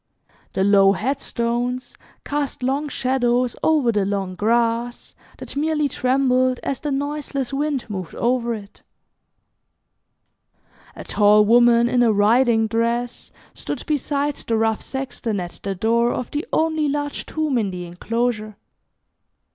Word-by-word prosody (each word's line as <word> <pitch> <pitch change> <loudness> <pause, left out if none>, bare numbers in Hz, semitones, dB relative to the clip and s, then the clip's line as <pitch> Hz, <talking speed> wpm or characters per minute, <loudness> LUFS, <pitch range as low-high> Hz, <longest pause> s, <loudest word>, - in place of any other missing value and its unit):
The 190 - +1
low 195 -1 +5
headstones 245 +1 -2 0.3
cast 285 -3 -3
long 280 +4 -1
shadows 250 -2 0
over 300 -7 +3
the 210 -3 +1
long 195 -1 -2
grass 230 +4 0 0.2
that - - -8
merely 300 0 +1
trembled 255 -1 +1
as 275 - -2
the 300 - -4
noiseless 280 -1 -3
wind 285 -2 -1
moved 190 -5 -6
over 240 -1 0
it. 205 -2 -12 2.1
A - - -8
tall 210 0 +4
woman 235 +1 +5
in 245 0 +2
a 235 -2 +4
riding 225 +2 +3
dress 235 +2 -2 0.2
stood - - -6
beside 290 -1 -1
the 225 - -2
rough 220 -1 +1
sexton 255 -5 -4
at 175 -1 -7
the 195 -1 -3
door 235 +5 +2
of 250 - -4
the 295 +3 -3
only 315 -2 +1
large 290 0 -3
tomb 305 -5 0
in 210 -3 -1
the 180 -1 -6
enclosure. 215 +4 -3
240 Hz, 130 wpm, -21 LUFS, 220-275 Hz, 2.1 s, low